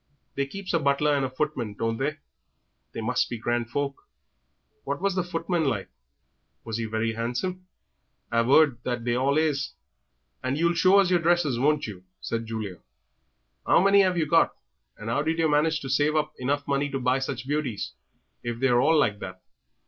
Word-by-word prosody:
They 140 0 -1
keeps 195 +5 -6
a 165 - +3
butler 145 +1 +2
and 140 - 0
a 130 - -1
footman, 130 -6 -3
don't 115 +1 -1
they? 150 +4 -2 0.7
They - - -5
must 125 +3 0
be 120 - -4
grand 120 +1 -1
folk. 140 +2 -3 0.7
And - - -43
what 140 +1 -2
was 200 +1 0
the 185 - +1
footman 170 -1 -1
like? 115 -8 -1 0.7
Was 115 -1 -4
he 115 - -1
very 110 +1 -1
handsome? 125 +12 -3 0.6
I've 115 +1 +2
'eard 140 -4 +5
that 120 -1 -3
they 120 - +1
all 135 +3 +2
is." 150 -3 0 0.7
"And 130 +2 -1
you'll 170 +2 +2
show 185 +3 +5
us 195 -2 +4
yer 175 - +4
dresses, 165 -7 +2
won't 150 +3 +2
you?" 95 -4 -8 0.2
said 115 0 -3
Julia. 110 -5 -5 0.9
"How - - +6
many 195 +2 +5
'ave 185 -2 +1
you 160 - +2
got, 165 +2 +3 0.4
and 105 - -8
'ow 115 +5 +1
did 160 +2 -1
yer 165 -1 +3
manage 155 +1 +2
to 135 - -6
save 145 +3 +2
up 155 - 0
enough 140 +3 -1
money 140 +1 0
to 135 - -3
buy 125 +1 +2
such 135 -1 -4
beauties, 140 -8 -2 0.5
if 120 -1 -4
they're 125 -2 +3
all 160 +4 +4
like 105 -8 +2
that?" 95 -1 -7
140 Hz, 195 wpm, -26 LUFS, 120-160 Hz, 0.9 s, How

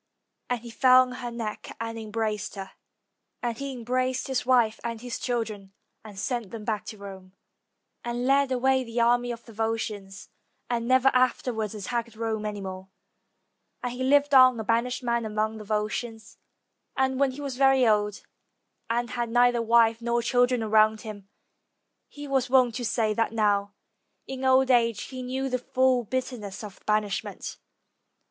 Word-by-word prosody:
Then 245 - +1
he 235 0 -10
fell 255 +1 +6
on 255 - -7
her 250 -1 -5
neck 230 -3 -6
and 225 0 -4
embraced 215 -1 -3
her, 195 -1 -7 0.7
and 240 -1 -1
he 275 0 -4
embraced 255 +1 -1
his 260 -2 -2
wife 235 -4 +3
and 230 -1 -4
his 245 +1 -5
children 215 -5 -3 0.3
and 210 -3 -11
sent 235 0 -3
them 220 0 -8
back 215 -2 -2
to 215 - -8
Rome; 190 -2 -10 0.7
and 240 +1 -3
led 275 0 +3
away 260 +1 +2
the 235 0 -4
army 240 +1 +3
of 235 -1 -8
the 230 - -13
Volscians, 210 -3 -4 0.4
and 235 -1 -1
never 260 +1 +5
afterwards 245 -4 0
at 205 - -7
tacked 235 +1 -3
Rome 220 -1 -2
any 205 -1 -5
more; 190 0 -7 0.9
and 245 -1 -2
he 255 +1 -4
lived 285 +2 +3
on 255 -3 +7
a - - -2
banished 235 +3 0
man 235 -1 0
among 215 0 -2
the - - -8
Volscians, 220 +2 -3 0.6
and 265 0 +1
when 280 -1 +3
he 260 +2 -8
was 275 -3 -4
very 270 -1 +5
old, 210 -1 +1 0.7
and 240 +1 -1
had 240 -2 -2
neither 245 0 +3
wife 230 0 +4
nor 235 0 0
children 245 0 +2
around 215 0 +3
him, 205 -3 -9 0.8
he 290 0 -9
was 265 -2 0
wont 250 -2 +4
to 245 - -4
say 220 0 +1
that 225 +1 0
now 205 -2 +1 0.5
in 265 0 -5
old 260 0 +4
age 230 -3 +3
he 255 -1 -7
knew 260 +2 -3
the 255 -1 -1
full 255 0 +2
bitterness 225 -4 -4
of 205 -3 -10
banishment. 210 -1 -2
235 Hz, 170 wpm, -26 LUFS, 215-255 Hz, 0.9 s, on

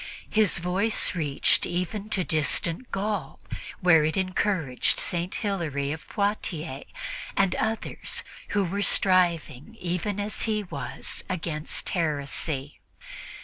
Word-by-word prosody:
His 215 -3 +4
voice 185 +6 +2
reached 150 -6 +3
even 195 +4 -2
to 190 -4 +1
distant 165 - +1
Gaul, 195 -7 -2 0.4
where 165 -4 +6
it 155 +5 0
encouraged 185 -7 +1
St. 175 +1 -2
Hilary 155 -9 -1
of 155 0 -6
Poitiers 170 - -2 0.5
and 195 -2 +4
others, 220 0 -1 0.2
who 205 -1 +1
were 200 +4 -1
striving, 180 - +2
even 180 +3 -2
as 205 +1 -2
he 215 -1 +1
was, 185 - -5
against 160 -4 -3
heresy. 145 -3 -1
180 Hz, 110 wpm, -27 LUFS, 155-200 Hz, 0.5 s, where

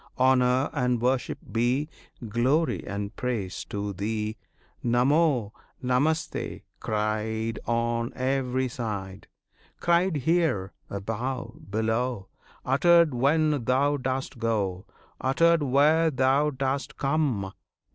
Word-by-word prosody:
Honour 130 +1 +3
and 125 -4 +1
worship 125 +2 0
be 125 +6 +1 0.4
Glory 130 +9 +1
and 100 +1 -4
praise, 115 -8 -3
to 100 0 -4
Thee 105 +2 -2 0.5
Namo, 125 -1 +2 0.3
Namaste, 140 +6 0 0.2
cried 110 +1 -2
on 115 0 0
every 130 0 0
side; 105 -6 -5 0.5
Cried 175 +1 +2
here, 150 - +1 0.2
above, 115 +4 -5
below, 110 0 -1 0.4
Uttered 170 +3 +4
when 145 +1 +2
Thou 140 +3 +2
dost 130 -1 -3
go, 105 -4 -1 0.3
Uttered 165 +5 +3
where 150 +4 +4
Thou 135 +1 +2
dost 140 +1 -3
come! 135 -10 0
125 Hz, 95 wpm, -26 LUFS, 110-140 Hz, 0.5 s, Uttered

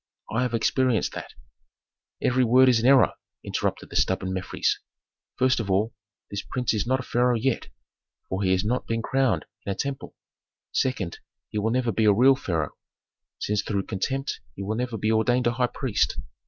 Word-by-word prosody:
I 115 - +1
have 125 -2 0
experienced 120 -1 +1
that - - -8 0.4
" - - -23
"Every 130 0 +3
word 125 +2 +6
is 120 -3 +4
an 115 - +2
error," 135 -4 +6 0.3
interrupted - - -2
the - - -8
stubborn 95 0 +1
Mefres. 95 -1 -1 0.6
"First 130 -1 +2
of 105 -4 -3
all, 105 +4 +1 0.4
this 100 0 -3
prince 125 -2 -1
is 110 +1 -1
not 130 +1 +3
the 130 - -6
pharaoh 125 0 +2
yet, 120 +2 0 0.6
for 95 +1 -2
he 95 -2 +2
has 95 +2 +1
not 125 +4 -1
been 115 0 -1
crowned 130 - +1 0.2
in 100 - -3
a - - -2
temple. 140 +3 -4 0.6
Second, 110 -10 -1 0.3
he 105 - -2
will 110 +2 +1
never 120 0 +1
be 110 +2 +1
a 105 - +6
real 130 +6 +6
pharaoh, 80 - -2 0.6
since 105 0 0
through 100 -2 -2
contempt 135 +8 -2 0.2
he 100 - -5
will 105 +3 -2
never 120 -1 -2
be 110 +2 0
ordained 120 +3 +2
a 120 - +3
high 125 +1 +1
priest. 125 -4 0
115 Hz, 190 wpm, -25 LUFS, 100-125 Hz, 0.6 s, word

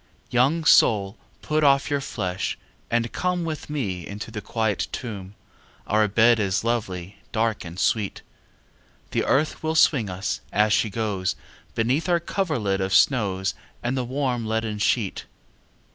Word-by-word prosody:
II. - - -35
Young 140 +7 +2
soul 100 -9 +5 0.3
put 155 0 +1
off 140 0 +4
your 140 -1 +1
flesh, 95 -8 -3 0.3
and 115 0 0
come 180 -1 -1
With 155 -2 -5
me 100 - -3
into 105 +3 -7
the 105 -1 -5
quiet 110 -1 -1
tomb, 100 -5 -6 0.5
Our 105 +1 +3
bed 115 +3 +4
is 100 -1 0
lovely, 100 -5 -2
dark, 110 -1 0
and 85 +1 -8
sweet; 105 -1 0 0.9
The - - +1
earth 150 +3 +1
will 160 0 -1
swing 135 -9 +4
us, 90 +2 -3
as 105 0 +3
she 110 - +2
goes, 100 -3 -1 0.4
Beneath 130 +10 +1
our 175 -1 +4
coverlid 145 - -1
of 95 0 +1
snows, 100 -7 +3 0.3
And 120 +2 0
the 130 - 0
warm 125 -1 -1
leaden 110 -1 -1
sheet. 105 -1 0
110 Hz, 150 wpm, -24 LUFS, 100-135 Hz, 0.9 s, soul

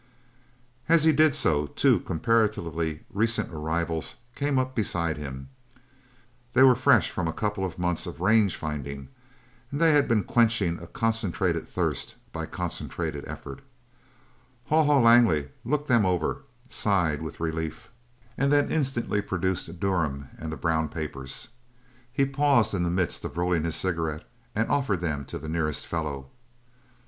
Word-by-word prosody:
As 165 -2 +5
he 160 - +6
did 155 -1 +4
so 75 -1 +1
two - - +3
comparatively 85 -6 0
recent 110 -2 0
arrivals 80 +1 -2 0.2
came 140 0 0
up 130 0 0
beside 85 -8 0
him. 65 -2 -7 1.0
They 130 - +6
were 130 -1 +8
fresh - - +3
from 90 - -2
a - - 0
couple 105 +1 -2
of 95 -3 -4
months 90 -1 -1
of - - -7
range 100 +1 +3
finding, 70 -3 -5 0.6
and 140 +1 -4
they 165 -1 +5
had 145 -1 +4
been 110 -4 +2
quenching 110 -7 +2
a 85 - -10
concentrated 115 -4 -1
thirst - - -2 0.2
by - - -4
concentrated - - -4
effort. 70 - -8 1.1
Haw 155 0 +4
Haw 145 -2 +4
Langley 115 -12 +5
looked 145 +4 -1
them 120 -4 +4
over, 90 -4 -1 0.2
sighed 90 -8 +1
with 80 - -7
relief, 80 -1 -4 0.5
and 140 +1 +2
then 145 0 +3
instantly 130 -8 0
produced 95 -2 -2
Durham 80 -9 -1
and 80 0 -5
the 80 - -5
brown 80 +2 0
papers. 70 - -6 0.6
He 135 +2 +2
paused 135 -5 +2
in 95 - 0
the 85 - +1
midst 90 -1 0
of - - -6
rolling 85 -2 +1
his 85 - -1
cigarette 80 -4 -2 0.3
and 115 +1 +1
offered 130 -11 0
them 75 -5 -2
to - - -6
the 80 - -8
nearest 80 -2 -1
fellow. 70 -5 -4
90 Hz, 150 wpm, -26 LUFS, 80-115 Hz, 1.1 s, were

